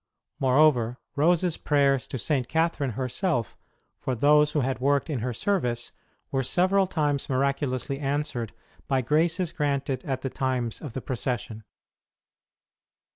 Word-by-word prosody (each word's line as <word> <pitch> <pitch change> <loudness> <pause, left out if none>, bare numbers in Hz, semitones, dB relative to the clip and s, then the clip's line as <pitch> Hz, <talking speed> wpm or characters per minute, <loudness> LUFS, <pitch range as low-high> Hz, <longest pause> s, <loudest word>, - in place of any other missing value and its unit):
Moreover, 130 -3 +3 0.2
Rose 165 +4 +3
s 175 -3 0
prayers 140 -3 +2
to - - -4
St. 130 0 0
Catherine 160 -5 0
herself 130 - -1 0.4
for 130 - -2
those 150 +4 +4
who 150 - +2
had 130 0 -1
worked 140 +4 +1
in 135 - -1
her 125 +3 -2
service 120 - -1 0.4
were 135 - +1
several 185 +8 +2
times 145 -5 -1
miraculously 135 0 -1
answered 140 -5 -2 0.4
by 135 -2 +2
graces 165 +6 +1
granted 140 -3 -1
at 130 -2 -3
the 135 - -2
times 125 -4 -2
of 145 -7 -7
the 130 - -4
procession. 120 -3 -3
140 Hz, 135 wpm, -26 LUFS, 125-150 Hz, 0.4 s, those